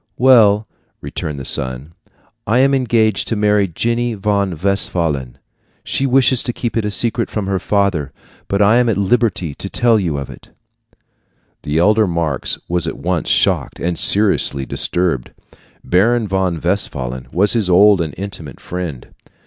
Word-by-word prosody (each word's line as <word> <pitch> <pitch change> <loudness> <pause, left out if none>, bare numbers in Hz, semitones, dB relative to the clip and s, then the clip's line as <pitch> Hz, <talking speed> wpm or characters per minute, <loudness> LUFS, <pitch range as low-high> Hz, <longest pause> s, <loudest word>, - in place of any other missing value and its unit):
"Well," 110 -5 +4 0.3
returned 75 -2 -6
the 65 - -7
son, 65 +3 -2 0.5
"I 110 +4 +2
am 135 +2 +3
engaged 115 -5 +1
to 115 - -1
marry 105 -1 +2
Jenny 120 +6 -1
von 100 -3 -1
Westphalen. 80 -8 -1 0.5
She 135 - -1
wishes 130 -1 +3
it - - -1
kept 115 -1 -4
a 105 -2 -1
secret 115 +2 0
from 105 -2 -3
her 95 -1 -1
father, 95 -10 -1 0.4
but 100 +1 +1
I 105 +4 +4
am 125 -1 +2
at 105 - 0
liberty 100 -6 0
to - - -8
tell 115 -2 +2
you 85 -7 -2
of 70 -1 -5
it." - - -14 1.1
The 75 +2 -3
elder 105 +5 +3
Marx 85 -6 -2
was 85 -1 0
at - - -4
once 90 -2 -2
shocked - - +1
and 85 0 -2
seriously 90 -8 +2
disturbed. 80 -2 -1 0.5
Baron 110 +5 +1
von 95 -3 -1
Westphalen 65 -9 -3
was 100 +4 +3
his 110 -6 +1
old 100 +1 +5
and 80 -4 -4
intimate 95 -8 -7
friend. 85 -8 -7
100 Hz, 155 wpm, -17 LUFS, 85-110 Hz, 1.1 s, old